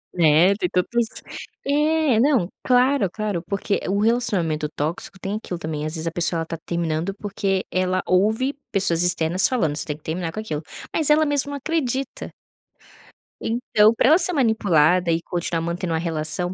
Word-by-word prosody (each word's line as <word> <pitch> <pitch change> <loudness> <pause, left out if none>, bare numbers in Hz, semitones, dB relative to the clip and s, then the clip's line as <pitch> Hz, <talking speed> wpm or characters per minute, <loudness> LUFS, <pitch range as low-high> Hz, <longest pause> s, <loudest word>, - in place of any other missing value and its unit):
É, 170 +3 +5
tem 180 -3 -2
tantos 230 +6 0 0.6
é, 300 -3 +2
não, 255 -7 +3 0.2
claro, 250 -4 +3
claro, 205 -4 -3
porque 200 0 -1
o 200 - +1
relacionamento 190 -10 0
tóxico 155 +5 -4
tem 195 +3 -3
aquilo 185 -5 -6
também, 155 -2 -4
às 155 - -5
vezes, 160 - -5
a 165 - -1
pessoa 170 0 0
ela 165 - -2
tá 165 - -5
terminando, 170 +2 -2
porque 195 -2 -2
ela 185 0 0
ouve 220 +9 +2 0.2
pessoas 190 -4 +2
externas 175 +1 +2
falando 190 - 0
"Você 150 - -3
tem 150 - -4
que 155 - -30
terminar 165 +1 -3
com 215 - -6
aquilo", 155 -9 -4 0.3
mas 310 -2 +1
ela 310 +1 +5
mesmo 290 -1 0
não 285 - -4
acredita. 275 -3 -3 1.1
Então, 225 -2 +3
pra 245 - +3
ela 315 - +7
ser 360 0 0
manipulada, 180 - +3
e 165 - 0
continuar 170 -1 -3
mantendo 170 +1 -3
uma 160 - 0
relação 165 +2 -2
185 Hz, 175 wpm, -22 LUFS, 165-240 Hz, 1.1 s, ela